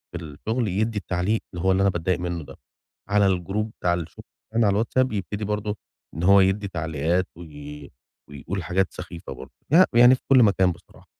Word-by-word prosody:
في 85 - -5
الشُغل 110 - -3
يدّي 110 +4 -1
التعليق 100 +2 -1
اللي 85 - -5
هو 95 - +4
اللي 95 +1 +2
أنا 100 - +4
باتضايق 90 0 -1
منُّه 85 -2 -3
ده 70 - -12 0.5
على 100 0 +3
الجروب 95 +4 -1
بتاع 90 -1 +2
الشُغل 85 -2 -6 0.3
كمان 115 -1 +3
على 100 +2 +2
الwhatsapp 130 +1 0
يبتدي 105 +1 -3
برضه 105 0 -3 0.4
إن 85 - -4
هو 100 +2 +6
يدّي 95 +2 +1
تعليقات 85 +1 -1
وي 75 -3 -10 0.4
ويقول 85 +7 -5
حاجات 95 +4 +1
سخيفة 85 -2 -8
برضه. - - -11 0.2
ي 185 +3 +8
ويعني 120 +2 +7
في - - -14
كل 130 -3 +7
مكان 95 -3 +3
بصراحة. 85 +1 -15
95 Hz, 190 wpm, -24 LUFS, 85-105 Hz, 0.5 s, ي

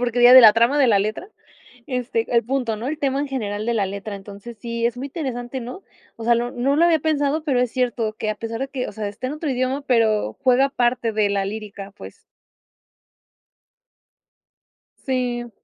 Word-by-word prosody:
Porque 245 0 0
diría 245 +1 +8
de 260 - +11
la 220 -3 +9
trama 235 +6 +2
de 270 - +5
la 205 -4 +4
letra, 215 - -4 0.6
este, 245 -3 -2
el 235 - +3
punto, 245 -2 -1
¿no? 230 +4 -6
El 305 +2 -3
tema 275 -1 0
en 290 - -2
general 215 -5 -3
de 235 - 0
la 205 -3 +1
letra, 200 +2 -6
entonces 200 +3 -10
sí 235 0 -2
es 240 - -3
muy 265 +3 -5
interesante, 260 -4 -5
¿no? 250 +11 -8 0.3
O 230 - -9
sea 235 0 +4
no 240 +1 -2
no 265 +3 0
lo 335 - +4
había 330 -2 +3
pensado, 305 0 0
pero 275 -5 0
es 250 -2 -1
cierto 240 -3 -1
que 215 - -2
a 210 - -4
pesar 230 +2 -5
de 270 - -2
que, 260 -3 -4
o - - -8
sea, 210 0 -4
está 205 +5 -6
en 260 - -3
otro 305 -1 -3
idioma, 255 +2 -1
pero 225 -5 +1
juega 260 +1 +4
parte 240 -3 0
de 210 -1 +1
la 200 -1 0
lírica 200 -1 -7
pues. - - -12 2.8
Sí. 245 -2 -2
240 Hz, 205 wpm, -22 LUFS, 220-265 Hz, 2.8 s, de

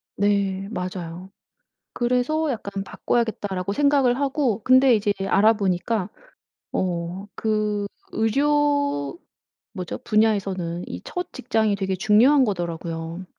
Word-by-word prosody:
네 200 -1 0
맞아요. 180 -2 -5 0.7
그래서 250 +6 +1
약간 200 -5 -4
'바꿔야겠다.'라고 205 -6 -2
생각을 275 -1 +3
하고 270 -6 0
근데 255 0 +6
이제 205 -1 +1
알아 215 +3 +5
보니까 195 0 -1 0.6
어 180 +2 -2
그 210 -2 -1 0.3
의료 285 - +1 0.5
뭐죠? 180 -4 -5
분야에서는 200 -7 0
이 90 - -6
첫 360 0 -5
직장이 220 -5 0
되게 190 -1 -1
중요한 240 +9 +5
거더라고요. 170 -3 -4
210 Hz, 250 characters per minute, -23 LUFS, 185-250 Hz, 0.7 s, 근데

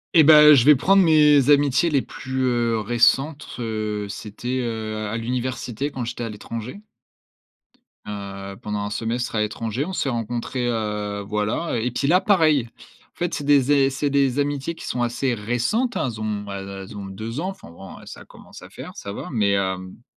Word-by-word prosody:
Et 160 - +8
ben, 150 0 +9
je 120 - +4
vais 150 0 +8
prendre 195 +8 +4
mes 150 -4 +5
amitiés 145 +2 +3
les 140 -3 +3
plus, 130 +1 -5
heu, 120 -3 +1
récentes, 130 +7 +2
heu. 110 -3 -3
C'était, 115 +5 -5
heu, 110 -2 -4
à 105 - -4
l'université 125 +2 -3
quand 130 -3 -4
j'étais 120 +1 -5
à 115 - -3
l'étranger. 115 - -7 1.3
Heu, 100 -1 -7
pendant 105 0 -3
un - - -3
semestre 115 +2 -3
à 105 - +1
l'étranger, 110 +5 -2
on 190 - -6
s'est 145 - -1
rencontrés, 120 +1 -3
heu, 105 -3 -2
voilà 105 +9 -1
et 125 +3 -1
puis 140 +3 -1
là, 180 +5 +4
pareil, 155 - +3 0.4
en - - -52
fait, 175 -1 -2
c'est 145 - -3
des 140 -1 +3
ai 135 -1 +4
c'est 140 +2 -1
des 140 -1 +1
amitiés 145 +3 -2
qui - - -10
sont 125 - -2
assez 120 +2 0
récentes, 120 - -1
elles 115 -5 -3
ont 105 -1 -3
elles 100 0 -6
elles 95 +1 -8
ont 100 - -6
2 110 +6 -6
ans, 185 - -2
enfin 195 - -10
bon, 90 +3 -11
ça - - -10
commence - - -15
à - - -12
faire, - - -10
ça 100 - -7
va, - - -7
mais, 105 -4 +1
hem 95 0 -2
120 Hz, 190 wpm, -23 LUFS, 105-140 Hz, 1.3 s, ben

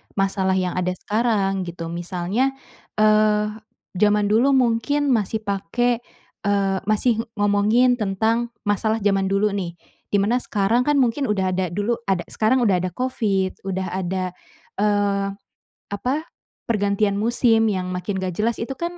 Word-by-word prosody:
Masalah 195 -1 +1
yang 185 -1 0
ada 180 0 0
sekarang 200 -3 0
gitu. 170 -1 -6
Misalnya, 180 +10 -1 0.4
eee, 215 0 +3 0.5
jaman 210 0 +3
dulu 265 +6 +4
mungkin 265 +4 +2
masih 220 -1 0
pake, 220 +5 0 0.5
eee, 195 -1 +1
masih 220 +2 +2 0.2
ngomongin 210 +5 +3
tentang 225 +4 0
masalah 215 +1 0
jaman 195 -1 +2
dulu, 195 +2 +1
nih. 180 -4 -4 0.3
Di - - -2
mana 230 +5 +2
sekarang, 230 +3 0
kan, 295 - +3
mungkin 265 +1 +2
udah 190 -3 0
ada 185 0 0
dulu 205 +5 -1
ada 190 -3 +1
sekarang 245 +4 +2
udah 195 -5 +3
ada 185 +1 -2
COVID, 200 -7 -1
udah 190 0 -2
ada, 185 0 -2 0.5
eee, 205 -1 +1 0.7
apa 250 +7 -1 0.5
pergantian 200 -2 +1
musim 225 -1 +3
yang 185 -2 -2
makin 185 +2 -3
nggak 185 -1 -3
jelas, 220 +6 0
itu 235 +4 -4
kan, 340 +5 -5
205 Hz, 140 wpm, -22 LUFS, 195-230 Hz, 0.7 s, dulu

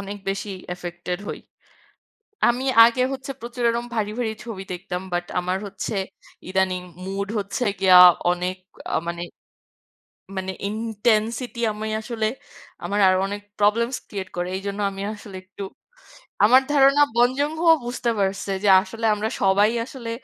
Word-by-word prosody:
অনেক 200 +1 -6
বেশি 195 +1 -3 0.2
অ্যাফেক্টেড্ 180 +1 -5
হই। - - -4 1.1
আমি 245 +2 0 0.2
আগে 235 +2 +3
হচ্ছে 265 0 -6
প্রচুর 240 +1 -5
এরকম 235 +1 -2
ভারী, 210 -2 -1
ভারী 230 -3 -1
ছবি 220 -5 -6
দেখতাম। 180 0 -5
বাট 175 0 0 0.2
আমার 180 +1 -1
হচ্ছে, 200 +2 -5 0.5
ইদানিং 185 -1 0 0.2
মুড 195 +1 -3
হচ্ছে 200 +5 -2 0.2
গিয়া 185 -1 +7 0.3
অনেক 180 +1 -2 0.4
আ - - +3
মানে, 170 0 -4 1.2
মানে 190 0 -2 0.2
ইনটেনসিটি 225 +2 -1
আমি 215 +1 -5
আসলে 225 -1 -3 0.6
আমার 205 - -1
আরও 185 0 +4
অনেক 205 +1 -5 0.2
প্রবলেমস্ 230 +5 +2
ক্রিয়েট্ 190 -2 -6
করে। 175 - -1
এইজন্য 200 +1 -5
আমি 195 0 -7
আসলে 210 -2 -11
একটু 200 +1 -9 0.8
আমার 255 +5 +7
ধারণা 275 0 +5
বং 240 +1 +5
জুন-হো 315 +4 0 0.2
বুঝতে 245 0 -1
পারছে 195 0 -1
যে 205 - +4
আসলে 225 +2 -8
আমরা 210 +1 -2
সবাই 200 +2 +4 0.2
আসলে 250 -3 -7
205 Hz, 140 wpm, -23 LUFS, 190-235 Hz, 1.2 s, গিয়া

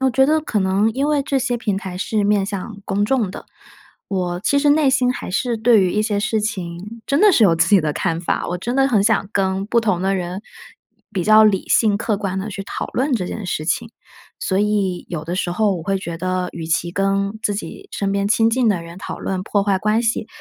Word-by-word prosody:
我 265 0 +2
觉 265 +2 +4
得 310 +2 +2
可 240 -8 -2
能 195 +3 +2
因 275 +5 0
为 295 -2 +2
这 275 0 0
些 245 -2 -1
平 210 -4 -1
台 185 -2 -6
是 210 +1 0
面 205 -1 +2
向 200 +1 -6
公 200 +1 0
众 220 -4 0
的。 - - -9 0.6
我 180 -2 -2
其 280 +8 +2
实 290 +1 +3
内 295 -1 +4
心 255 -1 +2
还 - - -6
是 235 +4 -1
对 220 -1 +4
于 185 - +1
一 210 - 0
些 210 -2 0
事 220 +1 0
情 200 +2 -5
真 280 +3 +1
的 420 -1 +6
是 240 - +4
有 170 -5 +5
自 165 +2 +2
己 200 -3 +5
的 150 -1 -1
看 165 +2 -1
法， 175 - -1
我 180 - -2
真 240 +7 -4
的 270 0 +4
很 220 -6 +3
想 210 -2 +1
跟 195 -1 0
不 235 +2 +2
同 205 -6 0
的 195 +1 +1
人 180 0 -4 0.7
比 185 - -1
较 215 0 +7
理 200 -3 +2
性、 215 -3 +3
客 220 -1 -1
观 195 -2 -3
地 195 +3 -4
去 195 -1 -5
讨 - - -4
论 270 +3 -1
这 190 -7 0
件 215 - -5
事 160 -4 -3
情。 225 +7 -1 0.5
所 190 - -1
以 200 -3 0
有 160 -3 -5
的 170 - -3
时 185 - -1
候 200 +2 +1
我 165 - -6
会 195 +3 -1
觉 170 -3 -6
得 185 +1 -2
与 165 -1 -6
其 165 +1 0
跟 195 +2 -1
自 205 - 0
己 390 - -7
身 200 -1 -1
边 200 0 0
亲 225 +1 +3
近 245 +1 +1
的 185 -5 0
人 170 +1 -11
讨 - - -6
论， 190 -1 -3
破 200 +1 0
坏 195 -1 +1
关 215 +4 +1
系， 225 -2 -1
200 Hz, 265 characters per minute, -20 LUFS, 185-230 Hz, 0.7 s, 较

